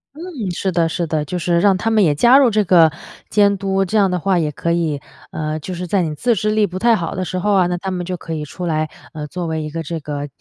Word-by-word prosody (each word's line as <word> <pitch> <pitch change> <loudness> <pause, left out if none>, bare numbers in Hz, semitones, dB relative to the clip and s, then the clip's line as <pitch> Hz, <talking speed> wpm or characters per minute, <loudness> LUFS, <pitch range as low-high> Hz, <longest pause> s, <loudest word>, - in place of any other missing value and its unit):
嗯， - - -12 0.3
是 190 +2 -2
的 170 -2 +1
是 170 +1 -2
的， 155 -2 -1
就 180 +5 -4
是 170 0 +1
让 195 0 +4
他 225 +5 -1
们 215 -2 +4
也 150 -4 +3
加 240 - +6
入 265 -4 +5
这 215 -1 +2
个 170 -4 +5 0.4
监 200 -1 +3
督， 195 0 0
这 210 +4 -1
样 195 -2 +4
的 180 - 0
话 190 +1 +1
也 155 -2 -1
可 170 +4 -2
以， 160 -4 0 0.3
呃， 155 0 -3
就 185 +5 -6
是 180 +1 -4
在 190 +2 +1
你 155 -3 -2
自 240 +9 +1
制 215 0 -1
力 215 -1 +3
不 185 0 -5
太 230 +2 +4
好 170 -5 -3
的 185 - -3
时 185 0 -4
候 205 +3 +1
啊， 185 -2 +4
那 180 0 -1
他 190 +1 -4
们 180 -1 -3
就 180 0 -4
可 165 -1 -7
以 155 -1 -3
出 175 +5 -6
来， 155 -1 -1 0.2
呃， 150 -2 -6
作 180 +2 -5
为 160 -1 -2
一 155 - -5
个 165 +2 -5
这 165 +1 -4
个 145 -1 -5
175 Hz, 310 characters per minute, -19 LUFS, 160-195 Hz, 0.4 s, 加